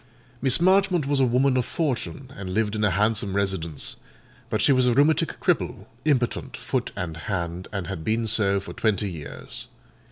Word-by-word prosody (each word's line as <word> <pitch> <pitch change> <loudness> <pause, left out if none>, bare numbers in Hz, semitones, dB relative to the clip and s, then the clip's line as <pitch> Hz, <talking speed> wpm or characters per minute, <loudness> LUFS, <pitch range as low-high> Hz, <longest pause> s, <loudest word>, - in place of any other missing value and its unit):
Miss 135 +1 +5
Marchmont 185 -2 +3
was 140 0 +2
a 135 - +5
woman 130 +2 +3
of 125 - +2
fortune, 140 -1 -3
and 95 -2 -5
lived 110 -1 +1
in 105 - -1
a 105 - +4
handsome 105 +1 +1
residence; 95 -7 -1 0.5
but - - 0
she - - +5
was 130 -2 +4
a 120 - +3
rheumatic 145 +3 +2
cripple, - - 0 0.2
impotent, 130 -6 0
foot - - -2
and 85 -3 -4
hand, 85 0 -4
and 95 -4 -3
had 90 -4 -5
been 115 +4 0
so 105 -3 +3
for 100 - -8
twenty 105 -3 0
years. 75 -4 -8
110 Hz, 180 wpm, -25 LUFS, 95-135 Hz, 0.5 s, Miss